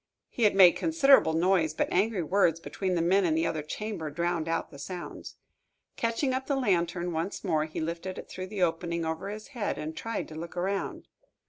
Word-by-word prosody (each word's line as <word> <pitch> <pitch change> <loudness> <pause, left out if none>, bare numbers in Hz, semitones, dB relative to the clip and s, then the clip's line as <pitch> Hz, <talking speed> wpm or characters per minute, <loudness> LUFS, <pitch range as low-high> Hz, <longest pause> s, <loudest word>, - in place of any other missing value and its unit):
He 235 - 0
had 205 - +4
made 185 -3 +9
considerable 275 - +4
noise, 165 -2 +2
but - - +1
angry 195 0 +1
words 165 -1 +2
between 185 +2 -2
the 165 - +1
men 190 +3 +3
in 165 -3 +2
the 160 +1 +1
other 165 -2 -1
chamber 165 +1 -5
drowned 170 +1 -1
out 165 - -2
the 140 - -11
sounds. 175 +4 -7 0.6
Catching 230 +4 0
up 260 +1 -2
the 280 - +1
lantern 175 -7 0
once 165 +4 -3
more, 160 -5 +1
he 155 - -6
lifted 170 +3 -4
it - - -8
through 185 0 -6
the 195 -1 -1
opening 170 0 -1
over 160 +4 -3
his 215 +3 -7
head, 235 -7 -3
and 155 +1 -5
tried 230 +6 -4
to - - -9
look 170 +2 -7
around. 195 +2 -2
175 Hz, 205 wpm, -28 LUFS, 165-200 Hz, 0.6 s, made